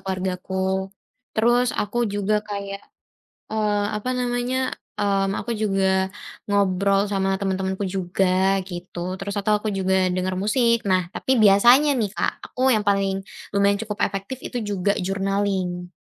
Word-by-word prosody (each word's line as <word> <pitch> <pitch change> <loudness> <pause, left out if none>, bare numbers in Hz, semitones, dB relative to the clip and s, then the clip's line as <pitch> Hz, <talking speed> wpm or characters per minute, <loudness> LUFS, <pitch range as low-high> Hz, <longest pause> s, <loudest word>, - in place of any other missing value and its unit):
keluargaku. 185 -1 -4 0.8
Terus 240 +3 +3
aku 205 +3 -4 0.2
juga 205 +1 0
kayak, 200 -1 -5 0.7
eee, 210 -1 +1
apa 210 +4 -4
namanya, 245 +1 -1 0.4
mmm, 195 -1 +1
aku 235 - -6
juga 195 -2 +1 0.6
ngobrol 200 -1 +2
sama 195 -1 0
temen-temenku 190 0 -1
juga 185 +1 0 0.4
gitu. 175 -1 -8 0.2
Terus 200 +1 -4
atau 210 +2 +1
aku 215 - -4
juga 190 0 +1 0.2
denger 185 0 -1
musik, 235 +3 +3 0.2
nah 185 0 +4
tapi - - -4
biasanya 235 +8 +6
nih, 210 -4 0
Kak, - - +1 0.2
aku 255 - -10
yang 210 -1 0
paling 195 -1 +2 0.4
lumayan 200 0 +3
cukup 210 -2 -5
efektif 195 +6 -5
itu 245 - -4
juga 200 0 +1
journaling. 195 -2 -1
200 Hz, 135 wpm, -23 LUFS, 190-210 Hz, 0.8 s, biasanya